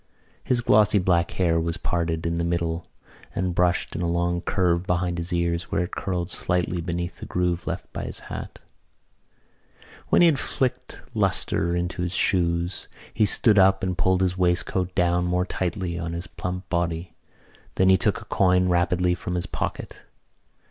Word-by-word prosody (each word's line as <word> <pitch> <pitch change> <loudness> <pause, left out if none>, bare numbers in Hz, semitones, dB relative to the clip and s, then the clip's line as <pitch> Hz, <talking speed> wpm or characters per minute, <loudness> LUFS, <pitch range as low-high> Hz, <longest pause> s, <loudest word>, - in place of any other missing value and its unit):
His 125 -2 +1
glossy 105 -2 +4
black 90 -3 +2
hair 85 -3 +1
was 85 0 -2
parted 85 -1 -2
in 85 0 -1
the - - 0
middle 85 -1 -2 0.5
and 90 -1 -1
brushed 90 0 +1
in 85 - -2
a 85 - 0
long 85 0 0
curve 90 -2 0
behind 90 -1 0
his 85 +2 -4
ears 85 -1 0
where - - +1
it 90 - -6
curled 90 -1 -3
slightly 90 -1 0
beneath 85 +1 -4
the - - -8
groove 90 -1 -1
left - - -5
by - - -4
his - - -6
hat. - - -7 1.5
When - - +5
he - - +8
had 155 -5 +4
flicked 130 -2 -2
lustre 85 +1 0
into 90 0 -2
his 90 +1 -2
shoes 85 -1 +1 0.3
he 105 -1 +3
stood 105 0 +5
up 95 0 +4
and 90 -1 -1
pulled 95 +1 +2
his 90 -1 +1
waistcoat 90 0 0
down 90 -1 +2
more 90 +1 +1
tightly 90 -1 -3
on 85 0 -4
his 85 +1 -4
plump 90 0 -5
body. 85 -1 -2 0.6
Then 95 0 +4
he 95 - +7
took - - 0
a - - -12
coin 90 -1 +2
rapidly 90 0 +2
from 90 0 -4
his 90 - -1
pocket. - - -5
90 Hz, 175 wpm, -24 LUFS, 85-90 Hz, 1.5 s, he